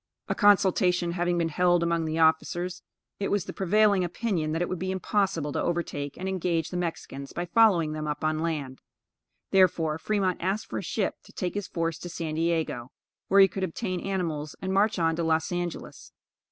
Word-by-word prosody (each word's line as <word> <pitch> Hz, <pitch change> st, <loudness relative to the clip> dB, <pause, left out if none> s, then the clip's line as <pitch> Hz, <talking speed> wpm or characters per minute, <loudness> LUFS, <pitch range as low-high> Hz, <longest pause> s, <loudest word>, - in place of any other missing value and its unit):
A -, -, 0 dB
consultation 185 Hz, -4 st, +3 dB
having 175 Hz, 0 st, 0 dB
been 165 Hz, -1 st, +1 dB
held 175 Hz, +1 st, +3 dB
among 170 Hz, -1 st, 0 dB
the 160 Hz, 0 st, -2 dB
officers, 175 Hz, +3 st, +1 dB, 0.4 s
it 200 Hz, -, -1 dB
was 200 Hz, -4 st, 0 dB
the -, -, -6 dB
prevailing 200 Hz, 0 st, +3 dB
opinion 175 Hz, -3 st, -1 dB
that 165 Hz, +2 st, -1 dB
it -, -, -2 dB
would 185 Hz, -, -4 dB
be 185 Hz, -, -3 dB
impossible 190 Hz, -5 st, 0 dB
to -, -, -1 dB
overtake 145 Hz, -5 st, -2 dB
and 190 Hz, -, -4 dB
engage 175 Hz, -4 st, -1 dB
the -, -, -5 dB
Mexicans 160 Hz, -5 st, -5 dB
by 175 Hz, -, -3 dB
following 175 Hz, -5 st, +4 dB
them 155 Hz, 0 st, -4 dB
up 150 Hz, +1 st, -3 dB
on 155 Hz, 0 st, +1 dB
land; 150 Hz, -5 st, -3 dB, 0.7 s
therefore 165 Hz, -5 st, +3 dB
Fremont 195 Hz, -2 st, 0 dB
asked 200 Hz, +5 st, -1 dB
for -, -, -4 dB
a -, -, -4 dB
ship -, -, -2 dB
to -, -, -15 dB
take 180 Hz, -3 st, -3 dB
his 205 Hz, -2 st, -3 dB
force 165 Hz, -1 st, -2 dB
to 175 Hz, -, -7 dB
San 165 Hz, -2 st, -4 dB
Diego, 160 Hz, -6 st, -1 dB, 0.4 s
where 195 Hz, 0 st, +6 dB
he 195 Hz, -, +8 dB
could 195 Hz, 0 st, -5 dB
obtain 185 Hz, +1 st, -2 dB
animals 165 Hz, -6 st, -3 dB
and 190 Hz, 0 st, -3 dB
march 205 Hz, +2 st, +3 dB
on 165 Hz, -2 st, +2 dB
to 170 Hz, -, 0 dB
Los 160 Hz, 0 st, +1 dB
Angelos. 175 Hz, -1 st, -5 dB
175 Hz, 195 wpm, -27 LUFS, 160-190 Hz, 0.7 s, he